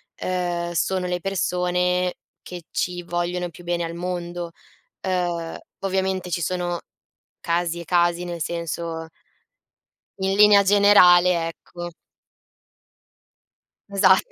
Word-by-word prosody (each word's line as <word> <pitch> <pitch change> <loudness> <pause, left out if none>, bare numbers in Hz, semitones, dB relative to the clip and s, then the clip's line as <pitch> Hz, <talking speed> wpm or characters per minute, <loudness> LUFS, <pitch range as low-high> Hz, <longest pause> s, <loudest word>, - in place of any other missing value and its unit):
ehm, 175 -1 -2
sono 180 +2 0
le 180 0 -1
persone 180 -1 0 0.3
che 175 -2 -9
ci 180 0 -2
vogliono 175 +1 -2
più 175 - -14
bene 175 0 -1
al 165 0 -4
mondo. 175 -1 -4 0.5
Ehm, 175 -3 -2 0.2
ovviamente 190 -1 -1
ci 175 - -1
sono 175 0 -2 0.6
casi 170 0 -1
e 170 - -8
casi 175 +1 +2
nel 170 -1 -5
senso 165 0 -4 1.1
in 190 0 0
linea 205 -1 +7
generale, 180 -4 +6
ecco 175 +1 -8 2.0
Esatto. 190 -1 +4
175 Hz, 105 wpm, -23 LUFS, 170-185 Hz, 2.0 s, linea